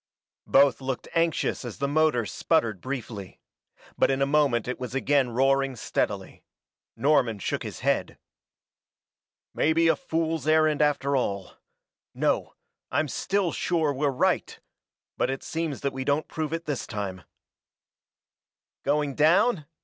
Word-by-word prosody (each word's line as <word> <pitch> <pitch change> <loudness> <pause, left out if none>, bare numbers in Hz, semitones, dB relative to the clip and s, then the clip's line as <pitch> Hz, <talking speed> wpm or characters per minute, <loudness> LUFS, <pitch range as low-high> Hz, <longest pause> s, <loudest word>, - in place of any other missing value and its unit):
Both 140 0 +4
looked 130 -1 -4
anxious 165 -1 0
as - - -7
the 140 - -1
motor 145 -5 +2
sputtered 110 - 0
briefly. 115 -7 -6 0.6
But - - +4
in 135 0 +1
a 135 - +3
moment 140 -5 +2
it 125 - -3
was 125 0 -5
again 135 -1 +2
roaring 135 +2 +2
steadily. 115 - -3 0.5
Norman 120 -3 +2
shook 100 - -2
his - - -7
head. - - 0 1.4
"Maybe 165 +2 +3
a 165 - +4
fool's 165 - -2
errand 155 -1 +3
after 140 -2 +2
all. 100 -7 -1 0.6
No - - 0 0.3
I'm 155 - 0
still 190 +6 0
sure 160 -4 0
we're 140 +2 0
right! 130 - 0 0.6
But - - +1
it 135 0 -3
seems 160 -4 -3
that 140 -1 -1
we 130 0 -4
don't 145 +3 0
prove 155 -2 -4
it 165 +1 -3
this 145 -4 -3
time." 100 -4 -4 1.6
"Going 145 0 +1
down?" 160 - +3
140 Hz, 135 wpm, -26 LUFS, 130-155 Hz, 1.6 s, Both